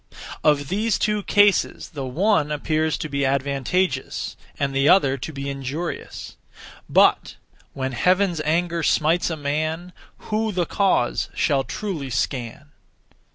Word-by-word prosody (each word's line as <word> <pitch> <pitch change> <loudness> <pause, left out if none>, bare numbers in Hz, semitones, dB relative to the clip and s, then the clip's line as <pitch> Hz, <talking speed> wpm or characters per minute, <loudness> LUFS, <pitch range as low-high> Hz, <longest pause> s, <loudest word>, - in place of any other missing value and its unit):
Of 145 -2 +2
these 210 +3 +1
two 210 -1 0
cases 205 0 +2
the 140 -5 -5
one 160 +2 +1
appears 155 +1 0
to 155 - -4
be 140 -1 -2
advantageous, 140 +3 -1 0.2
and 140 -1 -1
the 135 +2 +3
other 140 -8 +5
to - - -5
be 140 -1 -6
injurious. 140 +5 -5 0.5
But - - +3 0.4
When 130 -1 -3
Heaven's 180 +4 +2
anger 170 +2 0
smites 160 +3 +2
a 160 - -3
man, 155 +4 -2 0.4
Who 220 +1 0
the 180 -3 0
cause 190 -10 +1
shall 140 -2 +1
truly 165 -6 -4
scan? 125 +5 -3
155 Hz, 130 wpm, -23 LUFS, 140-180 Hz, 0.5 s, other